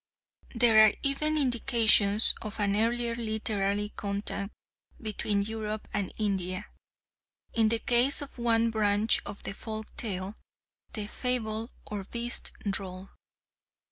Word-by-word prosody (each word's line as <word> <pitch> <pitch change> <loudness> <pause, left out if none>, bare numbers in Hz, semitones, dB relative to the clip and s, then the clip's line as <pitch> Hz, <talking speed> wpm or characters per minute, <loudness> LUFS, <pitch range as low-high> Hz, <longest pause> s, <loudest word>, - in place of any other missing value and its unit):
There 225 -2 +6
are 215 - +6
even 305 +2 +2
indications 230 -5 +4
of 215 0 -6
an 200 -1 +1
earlier 235 +2 +1
literary 210 -3 -1
contact 200 0 -3 0.5
between 210 -2 0
Europe 215 0 -4
and 205 -3 -2
India, 195 -2 -2 0.9
in 225 -2 +3
the 230 - +2
case 245 +4 +3
of 275 -3 -12
one 230 -1 +2
branch 210 0 +2
of 205 0 -8
the - - -4
folk 220 +1 -7
tale, 195 -2 -4 0.6
the 210 -2 -3
Fable 225 -1 -1 0.2
or 205 -2 -5
Beast 235 +3 -3 0.2
Droll. 190 -1 -4
215 Hz, 120 wpm, -29 LUFS, 205-230 Hz, 0.9 s, There